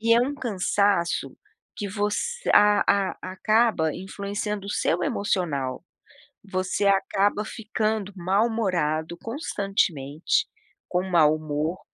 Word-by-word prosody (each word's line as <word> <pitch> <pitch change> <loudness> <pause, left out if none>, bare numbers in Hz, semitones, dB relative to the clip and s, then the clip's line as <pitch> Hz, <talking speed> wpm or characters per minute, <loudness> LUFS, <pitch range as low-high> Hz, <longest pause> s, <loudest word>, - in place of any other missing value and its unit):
E 230 +1 +4
é 235 - +5
um 270 +4 0
cansaço 200 -7 0 0.4
que 205 -3 -4
você 210 - -2
a 210 0 +6 0.3
a - - -15
acaba 215 -4 +2
influenciando 200 +1 -4
o - - -4
seu 175 -3 0
emocional, 150 -10 -1 0.6
você 190 0 -1
acaba 200 +1 +2
ficando 215 -2 -2
mal-humorado, 180 -5 0
constantemente, 195 - -1 0.4
com 180 0 0
mau 155 -4 +5
humor, 155 +3 -3
200 Hz, 105 wpm, -25 LUFS, 170-215 Hz, 0.6 s, a